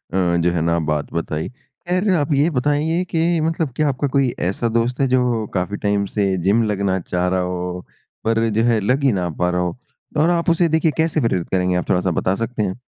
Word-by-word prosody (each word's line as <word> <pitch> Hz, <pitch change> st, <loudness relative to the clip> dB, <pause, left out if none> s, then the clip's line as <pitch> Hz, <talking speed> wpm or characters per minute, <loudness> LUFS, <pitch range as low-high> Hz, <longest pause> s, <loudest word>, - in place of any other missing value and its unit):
जो 85 Hz, -2 st, +2 dB
है 85 Hz, -2 st, -1 dB
ना 85 Hz, +1 st, +1 dB
बात 75 Hz, -2 st, -2 dB
बताई। 80 Hz, -2 st, -3 dB
ख़ैर 175 Hz, +9 st, -4 dB
आप 150 Hz, -1 st, 0 dB
ये 145 Hz, +4 st, +3 dB
बताइए 150 Hz, +5 st, 0 dB
कि 165 Hz, +1 st, +1 dB
मतलब 160 Hz, -3 st, -1 dB
क्या 150 Hz, 0 st, +1 dB
आपका 140 Hz, +1 st, -1 dB
कोई 135 Hz, -1 st, +2 dB
ऐसा 95 Hz, +6 st, -1 dB
दोस्त 115 Hz, +3 st, 0 dB
है? 135 Hz, -, +3 dB
जो 125 Hz, -3 st, +1 dB
काफ़ी 95 Hz, +2 st, -2 dB
टाइम 100 Hz, -1 st, 0 dB
से 100 Hz, -1 st, 0 dB
जिम 105 Hz, +5 st, +3 dB
लगना 95 Hz, -2 st, 0 dB
चाह 90 Hz, +1 st, -2 dB
रहा 95 Hz, 0 st, +1 dB
हो, 90 Hz, 0 st, -4 dB, 0.4 s
पर 115 Hz, 0 st, +1 dB
जो 110 Hz, +1 st, +1 dB
है 115 Hz, -2 st, +3 dB
लग 125 Hz, +8 st, 0 dB
ही 135 Hz, -, +4 dB
ना 90 Hz, -3 st, -1 dB
पा 90 Hz, 0 st, +2 dB
रहा 90 Hz, 0 st, 0 dB
हो? 90 Hz, -1 st, -2 dB, 0.4 s
और 155 Hz, +3 st, +4 dB
आप 170 Hz, 0 st, +1 dB
उसे 170 Hz, +1 st, +3 dB
देखिए 160 Hz, 0 st, +2 dB
कैसे 160 Hz, -1 st, +1 dB
प्रेरित 95 Hz, -7 st, 0 dB
करेंगे 90 Hz, -1 st, +1 dB
आप 90 Hz, -, -2 dB
थोड़ा-सा 90 Hz, 0 st, +2 dB
बता 95 Hz, +3 st, 0 dB
सकते 115 Hz, 0 st, -2 dB
हैं? 95 Hz, -2 st, -1 dB
110 Hz, 220 wpm, -20 LUFS, 90-145 Hz, 0.4 s, ही